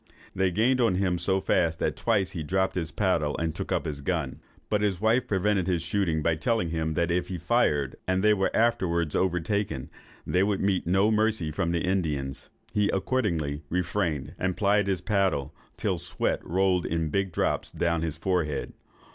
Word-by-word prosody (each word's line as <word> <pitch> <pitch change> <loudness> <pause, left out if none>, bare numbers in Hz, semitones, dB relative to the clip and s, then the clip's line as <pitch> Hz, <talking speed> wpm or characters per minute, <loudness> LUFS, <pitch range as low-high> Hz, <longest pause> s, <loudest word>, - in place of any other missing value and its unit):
They 95 0 +2
gained 120 +8 +2
on 115 -6 +3
him 90 -2 0
so 95 +2 +2
fast, 85 -3 +1
that - - -1
twice 95 -2 +1
he 85 - -5
dropped 95 +5 0
his 85 -3 -2
paddle, 85 -7 0
and 80 -1 -1
took - - -5
up - - 0
his 70 -2 -4
gun. 75 -4 -2 0.3
But 105 -1 +1
his 100 -4 0
wife 110 +4 +2
prevented 95 -1 +1
his 85 -3 0
shooting, 85 -4 0
by 80 0 +1
telling 100 -1 0
him, 80 -1 -1
that 85 0 +1
if 90 +1 0
he 90 - -4
fired, 75 - +1
and 95 +1 +1
they 105 0 +6
were 95 -2 +1
afterwards 85 -9 +1
overtaken, 95 -3 -1 0.3
they 90 - +1
would 100 0 +1
meet 95 -3 0
no 95 +4 +3
mercy 110 -7 +1
from 85 +2 -1
the 85 0 0
Indians. 75 -8 -2 0.2
He 105 -1 +2
accordingly 90 - -1
refrained, 85 -5 -1
and 95 -2 -1
plied 105 0 +2
his 95 -3 0
paddle, 95 - 0 0.2
till - - 0
the - - -6
sweat - - -1
rolled 90 0 +1
in 80 -1 -1
big 95 +2 0
drops - - 0
down 85 -1 0
his 80 -1 -3
forehead. 80 -4 -1
90 Hz, 190 wpm, -27 LUFS, 80-100 Hz, 0.3 s, they